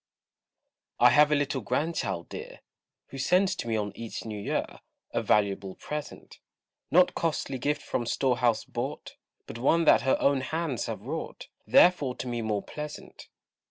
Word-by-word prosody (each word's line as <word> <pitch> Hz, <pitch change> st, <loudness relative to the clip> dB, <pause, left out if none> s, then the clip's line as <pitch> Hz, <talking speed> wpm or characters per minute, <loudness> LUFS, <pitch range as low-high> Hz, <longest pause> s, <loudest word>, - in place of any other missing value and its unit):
I 125 Hz, 0 st, +7 dB
have 150 Hz, +4 st, +5 dB
a -, -, +5 dB
little 145 Hz, -2 st, -1 dB
Grandchild 100 Hz, -, -2 dB
dear, -, -, -9 dB, 0.5 s
Who 135 Hz, -, -8 dB
sends 185 Hz, +6 st, +2 dB
to -, -, -5 dB
me 115 Hz, -, 0 dB
on 105 Hz, -1 st, -2 dB
each 115 Hz, -1 st, -7 dB
new 105 Hz, -2 st, -5 dB
year -, -, -1 dB, 0.5 s
A -, -, 0 dB
valuable 100 Hz, -1 st, +1 dB
present: 150 Hz, 0 st, -7 dB, 0.5 s
Not 180 Hz, +2 st, +5 dB
costly 150 Hz, -5 st, -2 dB
gift 150 Hz, +4 st, -1 dB
from 120 Hz, -, -2 dB
store 130 Hz, 0 st, +1 dB
house 115 Hz, -2 st, +2 dB
bought, -, -, -5 dB, 0.3 s
But 115 Hz, -, -8 dB
one 165 Hz, +6 st, +3 dB
that -, -, +6 dB
her 130 Hz, -, +2 dB
own 140 Hz, -1 st, +2 dB
hands 155 Hz, -2 st, -2 dB
have -, -, -5 dB
wrought, -, -, -6 dB, 0.2 s
Therefore 145 Hz, -8 st, +5 dB
to 120 Hz, -, -6 dB
me 120 Hz, -1 st, -2 dB
more 105 Hz, -2 st, -1 dB
pleasant. 150 Hz, 0 st, -8 dB
130 Hz, 160 wpm, -28 LUFS, 115-150 Hz, 0.5 s, I